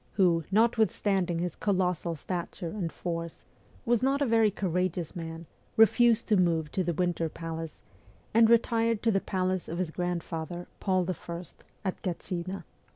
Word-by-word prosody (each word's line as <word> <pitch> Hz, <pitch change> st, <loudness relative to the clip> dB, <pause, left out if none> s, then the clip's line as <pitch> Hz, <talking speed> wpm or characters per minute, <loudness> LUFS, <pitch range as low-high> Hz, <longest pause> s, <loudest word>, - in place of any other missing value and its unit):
who, 175 Hz, -4 st, +3 dB
notwithstanding 205 Hz, -4 st, +2 dB
his 175 Hz, -1 st, -2 dB
colossal 180 Hz, -4 st, 0 dB
stature 170 Hz, +1 st, -4 dB
and 180 Hz, -6 st, -3 dB
force, 170 Hz, -1 st, -5 dB, 0.4 s
was 240 Hz, -2 st, +3 dB
not 270 Hz, +2 st, +2 dB
a 285 Hz, -, +2 dB
very 225 Hz, -3 st, +4 dB
courageous 180 Hz, -3 st, -1 dB
man, 165 Hz, -1 st, -6 dB, 0.3 s
refused 225 Hz, +1 st, +5 dB
to 215 Hz, -, +4 dB
move 165 Hz, -5 st, +2 dB
to 185 Hz, -, 0 dB
the 170 Hz, -1 st, -1 dB
Winter 175 Hz, -2 st, 0 dB
Palace, 165 Hz, 0 st, -6 dB, 0.5 s
and 225 Hz, 0 st, +6 dB
retired 230 Hz, -1 st, +3 dB
to 225 Hz, -, +4 dB
the 195 Hz, -2 st, +2 dB
palace 185 Hz, -1 st, -1 dB
of 170 Hz, -, -4 dB
his 180 Hz, -3 st, -1 dB
grandfather, 175 Hz, 0 st, -3 dB
Paul 185 Hz, -2 st, +1 dB
I., 175 Hz, -1 st, -4 dB, 0.4 s
at 190 Hz, -, -2 dB
Gatchina. 180 Hz, +1 st, -4 dB
180 Hz, 150 wpm, -29 LUFS, 170-210 Hz, 0.5 s, and